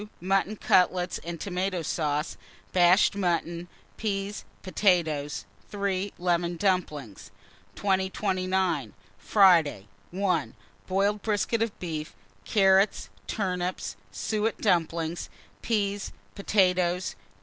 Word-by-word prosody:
Mutton 195 +3 +1
cutlets 180 -2 +2
and 170 -1 -6
tomato 185 -1 -2
sauce, 150 -1 -1 0.4
bashed 180 +3 +5
mutton, 175 -2 -1 0.3
peas, 200 -1 -3 0.2
potatoes. 165 -7 +1 0.2
3. 200 -1 -2
Lemon 175 -1 0
dumplings. 160 - -1 0.5
2029. 190 - 0 0.3
Friday. 170 - +4 0.2
1. 180 -4 -1 0.3
Boiled 200 +2 +1
brisket 215 +1 0
of 225 -2 -1
beef, 155 -3 -5 0.3
carrots, 195 -1 +3 0.2
turnips, 180 -3 -2 0.2
suet 215 - -1
dumplings, 165 0 0 0.3
peas, 205 -3 -1 0.2
potatoes. 185 -3 +1
185 Hz, 85 wpm, -27 LUFS, 170-200 Hz, 0.5 s, bashed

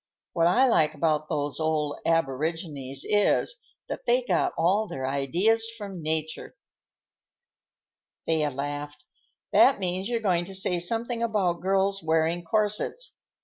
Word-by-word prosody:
What 165 -1 +3
I 250 +10 +4
like 155 -12 +2
about 155 0 0
those 145 0 -2
old 155 -2 -1
aborigines 150 -3 -2
is, 210 - +2 0.3
that - - -7
they 245 +2 +3
got 190 -8 +1
all 195 +6 +2
their 130 -7 -5
ideas 175 - +1
from 200 -5 -7
nature." 160 0 -3 1.7
Thea 155 -2 +1
laughed. 145 +2 -5 0.5
"That 270 - +5
means 185 +2 -1
you're 235 -1 0
going 180 -5 +1
to 195 +1 -4
say 180 -2 +2
something 230 +6 -1
about 195 -7 0
girls' 195 +1 +1
wearing 160 +2 0
corsets. 210 - 0
170 Hz, 130 wpm, -26 LUFS, 155-205 Hz, 1.7 s, That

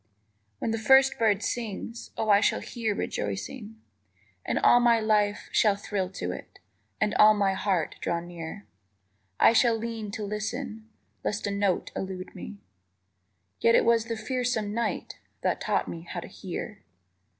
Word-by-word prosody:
_ - - -44 0.5
When 225 - -2
the 225 - -1
first 265 +4 +5
bird 215 -3 +2
sings, 230 0 -4
Oh, 220 -1 +1
I 200 0 +6
shall - - +2
hear 225 -4 -3
rejoicing, 210 - -4 0.6
And - - -1
all 240 - +6
my 235 -1 +4
life 210 -2 +1
shall 210 -3 +4
thrill 200 -2 -3
to 90 - -3
it - - -9 0.4
And 210 0 +1
all 215 0 +8
my 200 -2 +2
heart 190 -4 -1
draw 170 - 0
near. 175 +3 -8 0.7
I - - +7
shall 235 -1 +4
lean 225 -2 -4
to 215 - -4
listen 220 +2 -4 0.3
Lest 210 - -2
a 200 - -1
note 200 -2 0
elude 190 -1 -5
me, 210 - -8 1.0
Yet 230 - +5
it - - +4
was 230 -1 +3
the 230 -1 -3
fearsome 220 -2 -1
night 230 -1 -3 0.2
_That - - +1
taught - - 0
me 165 - -6
how 175 +1 -6
to - - -9
hear. 195 +2 -7
215 Hz, 160 wpm, -27 LUFS, 195-230 Hz, 1.0 s, all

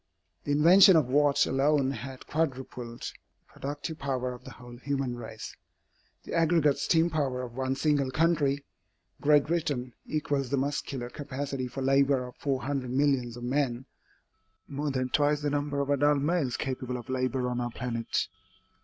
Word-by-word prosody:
The 145 - -1
invention 175 +6 +7
of 150 -6 +3
Watt 145 +1 +4
alone 135 0 +2
has 130 -1 -7
quadrupled 130 -6 -3
the - - -3 0.4
productive 145 +3 -6
power 130 -2 -2
of 125 +1 -12
the - - -10
whole 120 -1 -12
human 135 -1 -2
race. 110 -2 -8 0.7
The - - -8
aggregate 165 -4 +3
steam 165 +3 +2
power 135 -5 -1
of 120 -2 -7
one 130 +1 -1
single 145 -2 +1
country, 145 -2 +1 0.6
Great 145 -1 +5
Britain, 145 -7 -1
equals 145 -3 -1
the 140 - 0
muscular 135 -2 -2
capacity 140 -2 -4
for 135 +2 -5
labor 135 -1 +3
of 125 - -11
four 135 -2 -1
hundred 135 -3 -2
millions 130 -3 +1
of 120 - -8
men 130 -1 -1 0.8
more 145 +1 -3
than 130 -2 -1
twice 145 +2 +2
the 145 - 0
number 145 0 -1
of 140 0 -1
adult 145 +1 +3
males 140 -4 0
capable 130 -1 -3
of 120 - -9
labor 130 0 -1
on 125 0 -2
our 120 - -2
planet. 115 -1 -2
135 Hz, 160 wpm, -29 LUFS, 125-145 Hz, 0.8 s, invention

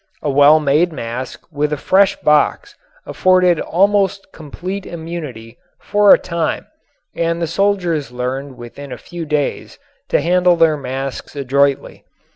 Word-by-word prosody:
A 145 - 0
well 145 +3 +6
made 155 +4 +2
mask 125 -2 -6
with 150 0 -1
a 150 - -1
fresh 190 +6 +3
box 150 - +1 0.3
afforded 185 -2 +2
almost 195 +1 +1
complete 180 +6 -7
immunity 155 -10 -8 0.2
for 205 -1 +3
a - - +9
time 170 -3 -3 0.5
and 170 0 -1
the 170 - 0
soldiers 170 -5 -1
learned 130 +2 -5
within 130 +4 -10
a 125 - -6
few 170 +6 -8
days 150 -1 -2 0.3
to - - +2
handle 180 +3 +3
their 165 -2 +3
masks 135 0 -6
adroitly. 140 0 0
155 Hz, 135 wpm, -17 LUFS, 140-180 Hz, 0.5 s, a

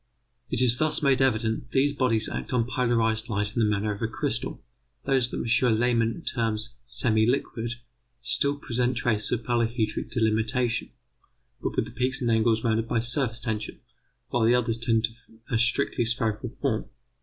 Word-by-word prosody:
It 125 +1 +2
is 120 -1 +5
thus 155 0 +2
made 135 -2 +3
evident 110 -3 +1
that 120 - -15
these 140 +2 +3
bodies 115 -5 +1
act - - -5
on 120 -2 +2
polarized 115 -3 0
light 105 -1 -1
in - - 0
the 110 -2 +3
manner 105 0 0
of 100 - -10
a 115 - +1
crystal. 130 0 -3 0.5
Those 130 -3 +3
that - - -5
M. 115 -1 +2
Lehmann 120 +4 +1
terms 115 -1 -1
semi 115 -2 +1
liquid 120 -2 -1 0.5
still 140 +4 0
present 125 -2 -1
traces 110 -3 0
of 120 -1 -1
polyhedric 115 -2 -1
delimitation, 115 +1 0 0.7
but - - -3
with - - +1
the 110 - -10
peaks 125 +2 0
and 120 -3 0
angles 110 0 +2
rounded 115 0 +1
by 120 - 0
surface 120 0 +1
tension, 110 -3 -3 0.5
while 120 - +1
the 120 +2 +5
others 115 -2 +1
tend 115 -1 +1
to 110 - 0 0.4
a 115 - +2
strictly 120 0 +2
spherical 115 0 -1
form. 125 -6 -1
115 Hz, 175 wpm, -26 LUFS, 110-125 Hz, 0.7 s, is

